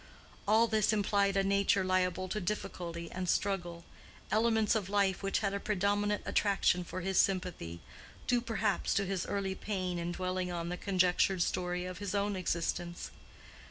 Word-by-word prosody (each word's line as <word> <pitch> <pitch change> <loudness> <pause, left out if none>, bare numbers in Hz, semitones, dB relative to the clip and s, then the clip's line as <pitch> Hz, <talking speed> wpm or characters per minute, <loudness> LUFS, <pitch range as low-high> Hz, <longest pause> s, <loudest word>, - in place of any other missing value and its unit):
All 220 +3 +5
this 220 -2 +2
implied 200 -1 +2
a 195 - +3
nature 200 0 +2
liable 185 0 +1
to 210 +2 -2
difficulty 170 -3 -4
and 185 -1 -3
struggle—elements 200 +5 -1
of 205 -4 -1
life 200 -2 +2
which 195 +2 0
had 200 - 0
a 200 - -1
predominant 205 +1 0
attraction 195 -3 +2
for 185 +1 -6
his 190 0 +1
sympathy, 175 - 0 0.4
due 245 -1 +2
perhaps 230 -3 0
to 200 - +2
his 190 -1 -2
early 195 -1 -1
pain 185 -3 -3
in 170 +1 -2
dwelling 185 0 -2
on 170 -1 -3
the 180 - -2
conjectured 185 -1 +2
story 180 0 -2
of 185 0 -6
his 205 0 -3
own 200 0 0
existence. 175 -1 -2
190 Hz, 160 wpm, -32 LUFS, 180-205 Hz, 0.4 s, All